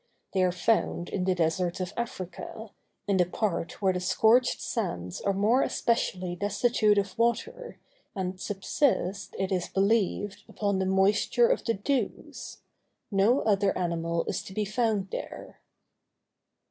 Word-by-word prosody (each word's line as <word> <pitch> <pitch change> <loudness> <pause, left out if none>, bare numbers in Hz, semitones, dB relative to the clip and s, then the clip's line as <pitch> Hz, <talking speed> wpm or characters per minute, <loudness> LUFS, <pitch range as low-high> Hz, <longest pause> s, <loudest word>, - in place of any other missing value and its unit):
They 190 - +2
are 180 - +3
found 180 -2 0
in 185 -2 -2
the 185 -1 +2
deserts 175 +2 0
of 180 0 -4
Africa, 220 -1 -6 0.4
in 200 -2 +2
the 180 - +4
parts 190 0 -3
where 190 -1 +4
the 180 - -2
scorched 225 +7 +3
sands 90 - -3
are 200 - +1
more 210 +7 +3
especially 185 -6 0
destitute 205 +2 +2
of 195 -2 0
water, 475 - -1 0.4
and 185 -1 -3
subsist, 200 - -1
it 190 0 -2
is 180 -2 0
believed, 200 0 0
upon 200 -2 -1
the 190 - 0
moisture 200 - +3
of - - +1
the 230 - 0
dews. 230 +3 -3 0.5
No 210 +7 +3
other 200 -2 +2
animal 170 -1 -1
is - - -2
to 190 - -10
be 215 - 0
found 210 -2 0
there. - - -7
195 Hz, 145 wpm, -28 LUFS, 185-220 Hz, 0.5 s, the